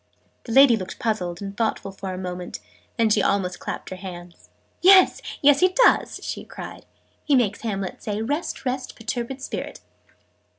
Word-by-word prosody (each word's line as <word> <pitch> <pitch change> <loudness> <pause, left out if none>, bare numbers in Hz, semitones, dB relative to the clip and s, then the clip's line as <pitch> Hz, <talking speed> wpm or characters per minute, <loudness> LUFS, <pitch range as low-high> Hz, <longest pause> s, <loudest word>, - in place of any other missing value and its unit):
The 230 - -6
lady 270 -1 +7
looked 190 -4 -6
puzzled 185 -5 -2
and 195 0 -6
thoughtful 220 -3 -1
for 195 0 -6
a 185 - -5
moment: 180 -1 -6 0.4
then 225 -2 +3
she 210 - +4
almost 190 -2 0
clapped - - -6
her - - -4
hands. 175 -2 -10 0.3
"Yes, 375 0 +7 0.2
yes, 280 -1 +6
he 370 0 +3
does!" - - +3
she - - -5
cried. - - -10 0.4
"He 290 - +3
makes 210 -5 +1
Hamlet 195 -4 -4
say 210 -1 -3
'Rest, 290 +4 -3
rest, 255 0 -3
perturbed 240 +3 -4
Spirit!"' - - -5
215 Hz, 165 wpm, -24 LUFS, 190-255 Hz, 0.4 s, lady